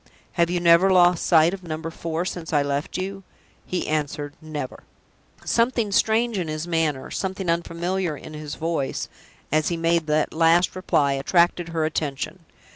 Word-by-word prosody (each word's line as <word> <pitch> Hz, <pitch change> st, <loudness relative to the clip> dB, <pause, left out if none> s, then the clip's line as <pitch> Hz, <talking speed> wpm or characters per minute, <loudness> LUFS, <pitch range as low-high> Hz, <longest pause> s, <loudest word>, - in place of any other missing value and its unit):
"Have 170 Hz, -1 st, +1 dB
you 175 Hz, 0 st, 0 dB
never 170 Hz, +2 st, +5 dB
lost 180 Hz, -2 st, +4 dB
sight 165 Hz, +1 st, +4 dB
of 195 Hz, -, -6 dB
Number 165 Hz, -1 st, -5 dB
Four 165 Hz, +1 st, -3 dB
since 175 Hz, -3 st, -5 dB
I 145 Hz, -2 st, +3 dB
left 140 Hz, +1 st, -2 dB
you?" 195 Hz, +1 st, -4 dB, 0.5 s
He 180 Hz, -, -2 dB
answered, 145 Hz, -1 st, -2 dB
"Never!" 155 Hz, -4 st, -6 dB, 0.6 s
Something 230 Hz, -3 st, +1 dB
strange 220 Hz, +1 st, +2 dB
in 175 Hz, -, -2 dB
his 155 Hz, +2 st, -4 dB
manner, 160 Hz, -5 st, -1 dB
something 190 Hz, -2 st, -2 dB
unfamiliar 170 Hz, 0 st, -2 dB
in 155 Hz, -, -10 dB
his 150 Hz, -1 st, -6 dB
voice, 160 Hz, -4 st, -2 dB, 0.4 s
as 155 Hz, +1 st, +2 dB
he 170 Hz, -, -1 dB
made 165 Hz, -1 st, +1 dB
that 150 Hz, 0 st, +1 dB
last 165 Hz, +3 st, +3 dB
reply, 145 Hz, -6 st, +1 dB
attracted 170 Hz, +5 st, +2 dB
her 165 Hz, -1 st, 0 dB
attention. 155 Hz, +2 st, -3 dB
165 Hz, 160 wpm, -24 LUFS, 155-180 Hz, 0.6 s, never